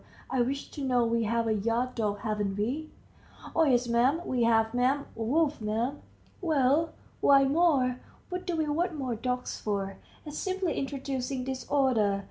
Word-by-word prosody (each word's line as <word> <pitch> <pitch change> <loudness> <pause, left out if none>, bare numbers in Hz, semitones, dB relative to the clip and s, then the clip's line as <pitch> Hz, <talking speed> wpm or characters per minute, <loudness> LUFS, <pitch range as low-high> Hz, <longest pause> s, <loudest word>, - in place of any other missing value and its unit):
I 260 - +2
wish 275 +3 -2
to 285 - -6
know. 250 -3 +2
We 230 0 +1
have 230 +1 +1
a 220 - +2
yard 230 +4 0
dog, 205 -3 -1
haven't 210 -3 -1
we?" 270 +10 -2 0.7
"Oh 325 - +5
yes, 245 -3 +3
'm, 255 +8 +2
we 245 -2 +1
have, 225 -1 +3
'm. 260 +3 +1
Wolf, 285 +5 0
'm." 225 +6 -1 0.4
"Well, 310 -1 +2 0.3
why 275 -1 +6
more? 270 -4 +3 0.3
what 360 0 -5
do 350 - 0
we 315 -1 +1
want 330 +3 0
more 260 -4 -2
dogs 250 +2 -3
for? 195 -2 -2 0.3
It's 300 0 -5
simply 375 -2 -1
introducing 270 -1 -3
disorder. 260 -6 +1
255 Hz, 160 wpm, -29 LUFS, 230-290 Hz, 0.7 s, why